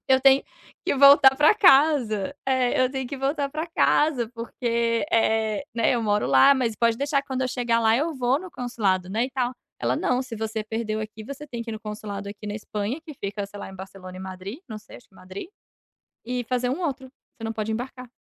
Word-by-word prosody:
Eu 260 Hz, 0 st, +6 dB
tenho 270 Hz, 0 st, +6 dB, 0.4 s
que -, -, +1 dB
voltar 275 Hz, -1 st, +8 dB
pra 300 Hz, +8 st, +5 dB
casa 280 Hz, -, +4 dB
é, 255 Hz, -1 st, +2 dB
eu 255 Hz, -, +2 dB
tenho 265 Hz, -1 st, -3 dB
que 280 Hz, -, -6 dB
voltar 280 Hz, +1 st, -1 dB
pra 310 Hz, +3 st, -4 dB
casa, 295 Hz, -7 st, +2 dB
porque, 235 Hz, +1 st, -1 dB
eh, 220 Hz, +1 st, +1 dB
né, 230 Hz, +2 st, +2 dB
eu 235 Hz, -, -1 dB
moro 210 Hz, -, +1 dB
lá. 135 Hz, -, +6 dB
Mas 250 Hz, -5 st, 0 dB
pode 230 Hz, +1 st, +2 dB
deixar 280 Hz, +2 st, +1 dB
que 280 Hz, -, -32 dB
quando 260 Hz, 0 st, -2 dB
eu 255 Hz, -, 0 dB
chegar 240 Hz, -2 st, 0 dB
lá 225 Hz, 0 st, +3 dB
eu 320 Hz, +5 st, 0 dB
vou 255 Hz, +1 st, +1 dB
no 370 Hz, 0 st, -9 dB
consulado, 200 Hz, -, -1 dB
né, 220 Hz, +5 st, 0 dB
e -, -, -11 dB
tal". 250 Hz, -1 st, -1 dB, 0.3 s
Ela: -, -, +1 dB
"Não, 250 Hz, 0 st, +1 dB
se 255 Hz, -3 st, -8 dB
você 220 Hz, 0 st, -3 dB
perdeu 220 Hz, 0 st, -3 dB
aqui 215 Hz, 0 st, -7 dB
você 280 Hz, +5 st, -8 dB
tem 235 Hz, -4 st, -5 dB
que 230 Hz, -, -7 dB
ir -, -, -4 dB
no 215 Hz, -, -6 dB
consulado 210 Hz, -1 st, -6 dB
aqui 205 Hz, +1 st, -10 dB
na 205 Hz, -, -4 dB
Espanha, 215 Hz, +5 st, -4 dB
que 320 Hz, -2 st, -11 dB
fica, 200 Hz, -3 st, -4 dB
sei 205 Hz, +1 st, -11 dB
lá, -, -, -7 dB
em -, -, -11 dB
Barcelona 185 Hz, -1 st, -10 dB
e 185 Hz, -, -8 dB
Madrid, 190 Hz, +5 st, -7 dB
não 215 Hz, -2 st, -6 dB
sei, 215 Hz, -, -14 dB
acho 245 Hz, -, -18 dB
que -, -, -29 dB
Madrid, 190 Hz, -, -9 dB, 0.8 s
e 250 Hz, 0 st, -2 dB
fazer 250 Hz, +1 st, -1 dB
um 290 Hz, -, -3 dB
outro. 275 Hz, -6 st, -3 dB, 0.3 s
Você -, -, -12 dB
não 225 Hz, -, -2 dB
pode 220 Hz, 0 st, -3 dB
embarcar". 250 Hz, +2 st, -6 dB
235 Hz, 230 wpm, -25 LUFS, 215-270 Hz, 0.8 s, voltar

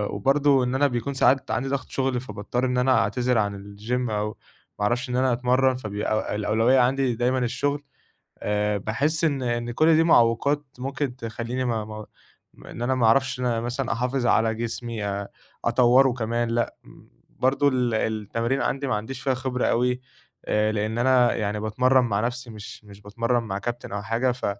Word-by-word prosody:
وبرضو 135 Hz, +4 st, +3 dB
إن 125 Hz, +1 st, -1 dB
أنا 145 Hz, +2 st, +3 dB
بيكون 125 Hz, +2 st, -3 dB
ساعات 135 Hz, 0 st, +2 dB
عندي 135 Hz, +4 st, -1 dB
ضغط 140 Hz, -1 st, -3 dB
شغل 130 Hz, -2 st, -1 dB
فباضطر 120 Hz, +1 st, -3 dB
إن 125 Hz, 0 st, 0 dB
أنا 130 Hz, +1 st, +3 dB
أعتذر 125 Hz, -1 st, 0 dB
عن 100 Hz, -1 st, 0 dB
الجيم 105 Hz, +5 st, -4 dB
أو 105 Hz, 0 st, -1 dB, 0.5 s
ما -, -, -1 dB
اعرفش 120 Hz, +4 st, 0 dB
إن 125 Hz, -, -2 dB
أنا 130 Hz, 0 st, +2 dB
أتمرن، 130 Hz, +2 st, +2 dB
فبيبقى 110 Hz, -2 st, -2 dB
الأولوية 115 Hz, +5 st, +3 dB
عندي 130 Hz, 0 st, +2 dB
دايمًا 125 Hz, +2 st, +1 dB
الشغل. 140 Hz, +4 st, -1 dB, 0.6 s
آآ، 105 Hz, 0 st, 0 dB
باحس 140 Hz, -, -1 dB
إن 140 Hz, -5 st, +1 dB
إن 120 Hz, -1 st, -2 dB
كُلّ 155 Hz, +6 st, +4 dB
دي 160 Hz, -, +4 dB
معوّقات 140 Hz, +1 st, +3 dB
ممكن 135 Hz, 0 st, -3 dB
تخليني 120 Hz, +2 st, -4 dB
ما 115 Hz, -3 st, -1 dB
ما 110 Hz, 0 st, -8 dB, 0.5 s
ما -, -, -14 dB
إن 115 Hz, -, -8 dB
أنا 130 Hz, +2 st, +1 dB
ما 125 Hz, -3 st, +2 dB
أعرفش 130 Hz, +2 st, +3 dB
إن 125 Hz, -, -1 dB
أنا 115 Hz, -2 st, 0 dB
مثلًا 125 Hz, +3 st, -2 dB
أحافظ 125 Hz, +1 st, -1 dB
على 115 Hz, -2 st, +3 dB
جسمي، 115 Hz, -1 st, -4 dB
آآ، 100 Hz, 0 st, -3 dB, 0.4 s
أطوره 125 Hz, +2 st, +4 dB
كمان 115 Hz, 0 st, -1 dB
لأ، 120 Hz, 0 st, -1 dB
امم، -, -, -17 dB, 0.2 s
برضو 135 Hz, +2 st, +1 dB
ال 125 Hz, -3 st, +1 dB
التمارين 110 Hz, +4 st, -1 dB
عندي 140 Hz, 0 st, -1 dB
ما 120 Hz, -, +1 dB
عنديش 110 Hz, +6 st, -5 dB
فيها 135 Hz, -, +1 dB
خبرة 130 Hz, -1 st, -2 dB
أوي 125 Hz, +1 st, +1 dB, 0.4 s
آآ، 105 Hz, 0 st, +1 dB
لأن 110 Hz, +1 st, -2 dB
أنا 125 Hz, 0 st, +4 dB
يعني 105 Hz, 0 st, -2 dB
باتمرن 125 Hz, +4 st, +2 dB
مع 100 Hz, -4 st, 0 dB
نفسي، 120 Hz, +2 st, -3 dB
مش 105 Hz, 0 st, -10 dB
مش 100 Hz, 0 st, -14 dB
باتمرن 115 Hz, +4 st, -1 dB
مع 95 Hz, -3 st, -4 dB
كابتن 120 Hz, -1 st, -5 dB
أو 105 Hz, -, -3 dB
حاجة، 115 Hz, +5 st, 0 dB
ف 125 Hz, -, -5 dB
120 Hz, 185 wpm, -24 LUFS, 110-130 Hz, 0.6 s, كُلّ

